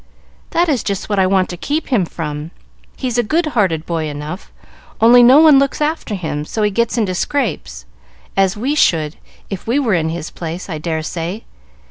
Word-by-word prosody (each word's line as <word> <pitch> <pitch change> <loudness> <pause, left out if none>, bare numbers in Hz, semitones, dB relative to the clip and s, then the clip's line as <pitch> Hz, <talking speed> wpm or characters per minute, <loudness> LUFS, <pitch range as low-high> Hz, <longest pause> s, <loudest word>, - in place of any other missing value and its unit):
"That 345 +1 +1
is 275 -8 +1
just 200 0 -3
what 205 -2 +1
I 190 - +4
want 190 -1 +2
to 175 - -5
keep 300 - -2
him 225 -9 +2
from! 150 -2 -5 0.5
He's 245 -3 -1
a - - +3
good 320 +10 +1
hearted 170 -8 +1
boy 165 -2 -2
enough, 150 +5 -7 0.5
only 240 +2 +7
no 255 +4 +7
one 310 -3 +7
looks 275 0 0
after 300 -7 -1
him; 155 -5 -3
so 215 +8 -3
he 210 - +2
gets 235 +3 0
into 205 -5 0
scrapes, 155 - -2 0.5
as 195 +1 +2
we 260 +7 -1
should, 160 - +2 0.3
if 195 +1 -6
we 240 +4 +1
were 250 -8 +1
in 160 -2 +1
his 165 0 -5
place, 170 +1 -6
I 155 - -4
dare 160 0 -2
say. 175 +7 -4
195 Hz, 195 wpm, -17 LUFS, 165-245 Hz, 0.5 s, only